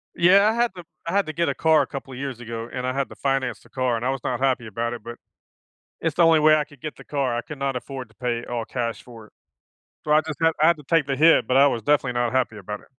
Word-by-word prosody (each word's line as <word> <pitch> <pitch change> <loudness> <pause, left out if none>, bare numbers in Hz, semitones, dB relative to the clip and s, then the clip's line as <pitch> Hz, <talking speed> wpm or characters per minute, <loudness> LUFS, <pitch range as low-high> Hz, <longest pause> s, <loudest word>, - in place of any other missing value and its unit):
Yeah, 195 +5 +5
I - - +1
had 235 -3 +1
to 175 - -9 0.2
I 170 - -3
had 200 0 +2
to 155 - -4
get 170 +2 0
a - - -2
car 160 -2 +4
a 135 - -2
couple 135 -1 -8
of 125 - -8
years 135 -3 -5
ago, 115 -1 -6
and 125 0 -3
I 130 - -1
had 135 0 -2
to - - -11
finance 135 -2 -1
the - - -21
car, 130 -2 0
and 115 - -3
I 130 - +1
was 135 -2 -2
not 125 -1 -2
happy 130 -4 0
about 115 +3 -3
it, 115 -3 -8
but 120 0 -8 0.8
it's 165 -3 -1
the 175 - +4
only 165 -2 +5
way 155 0 +6
I 150 - 0
could 145 -2 -19
get 155 +2 -6
the - - -13
car, 135 -5 -1
I 120 - -1
could 150 - -9
not 135 -2 -2
afford 130 -1 -6
to 110 - -25
pay 120 0 -3
all 120 -2 -4
cash 115 -1 -4
for 115 -3 -13
it. - - -26 0.7
So, 150 - 0
I 155 - +6
just 155 -3 -6
have 165 0 +4
I 155 - +5
had 170 - +4
to - - -11
take 165 -2 +2
the 135 - -1
hit, 160 -5 +5
but 130 - +1
I 140 - +7
was 120 -5 0
definitely 140 -2 +2
not 120 0 0
happy 125 -4 0
about 105 +1 -7
it. - - -21
135 Hz, 310 wpm, -23 LUFS, 120-155 Hz, 0.8 s, I